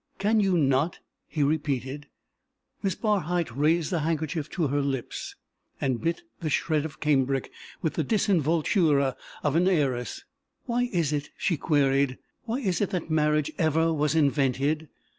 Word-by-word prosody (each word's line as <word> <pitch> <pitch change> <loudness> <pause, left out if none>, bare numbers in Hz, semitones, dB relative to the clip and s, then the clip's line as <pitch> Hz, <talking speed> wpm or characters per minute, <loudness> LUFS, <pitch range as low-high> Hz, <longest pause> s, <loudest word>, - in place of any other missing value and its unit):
"Can 215 +3 +2
you 195 -3 +3
not?" 140 +2 +2 0.3
he 150 - -1
repeated. 145 -1 -1 0.7
Miss 195 -3 0
Barhyte 175 - 0
raised 160 +5 +2
a 170 - +1
handkerchief 155 -1 -2
to 170 - -1
her 145 +1 +1
lips 135 -3 -3 0.4
and 130 -3 -1
bit 165 - -1 0.2
the 160 - -2
shred 155 +1 +1
of 155 - -8
cambric 135 -3 +1 0.3
with 160 - 0
the 160 - 0
disinvoltura 160 - +2 0.3
of 145 -1 +1
an 175 +2 +4
heiress. 135 -9 0 0.4
"Why 245 0 0
is 165 -5 +1
it," 145 0 -2
she 175 - +1
queried, 140 -3 +2 0.3
"why 240 +4 -2
is 185 -8 0
it 205 - +1
that 175 -3 -3
marriage 150 -1 +2
ever 160 0 +2
was 150 0 +1
invented? 145 +1 +1
155 Hz, 150 wpm, -27 LUFS, 140-175 Hz, 0.7 s, an